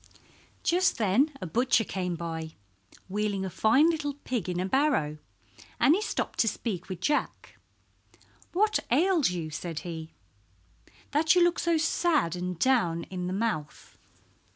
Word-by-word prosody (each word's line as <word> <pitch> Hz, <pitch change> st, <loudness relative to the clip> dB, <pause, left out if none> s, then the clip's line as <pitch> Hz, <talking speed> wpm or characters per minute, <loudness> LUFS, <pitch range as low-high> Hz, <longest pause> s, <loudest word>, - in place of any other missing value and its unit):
Just 370 Hz, +2 st, +2 dB
then 230 Hz, +7 st, +2 dB
a -, -, -3 dB
butcher 230 Hz, +6 st, +2 dB
came 180 Hz, -4 st, -3 dB
by, 160 Hz, -1 st, -5 dB, 0.5 s
wheeling 200 Hz, 0 st, -1 dB
a 190 Hz, -, -5 dB
fine 230 Hz, -, +4 dB
little 290 Hz, -3 st, -3 dB
pig 245 Hz, -, -4 dB
in 175 Hz, -1 st, -2 dB
a 185 Hz, -, 0 dB
barrow, 195 Hz, -, +1 dB, 0.6 s
and 290 Hz, -, +5 dB
he 390 Hz, -, +1 dB
stopped 430 Hz, -, -3 dB
to 225 Hz, -, +3 dB
speak 200 Hz, -5 st, -3 dB
with 185 Hz, -2 st, -5 dB
Jack. 295 Hz, +9 st, -1 dB, 1.0 s
"What 425 Hz, +4 st, +2 dB
ails 325 Hz, -, +3 dB
you," 170 Hz, -3 st, -4 dB
said 160 Hz, +1 st, -5 dB
he, 160 Hz, -2 st, -7 dB, 1.0 s
"that 315 Hz, +3 st, +3 dB
you 355 Hz, -, +5 dB
look 345 Hz, 0 st, +2 dB
so 340 Hz, -1 st, +2 dB
sad 310 Hz, -, +1 dB
and 180 Hz, 0 st, -4 dB
down 175 Hz, -8 st, +2 dB
in 180 Hz, -1 st, -3 dB
the -, -, -3 dB
mouth?" 195 Hz, -7 st, -3 dB
210 Hz, 150 wpm, -28 LUFS, -, 1.0 s, and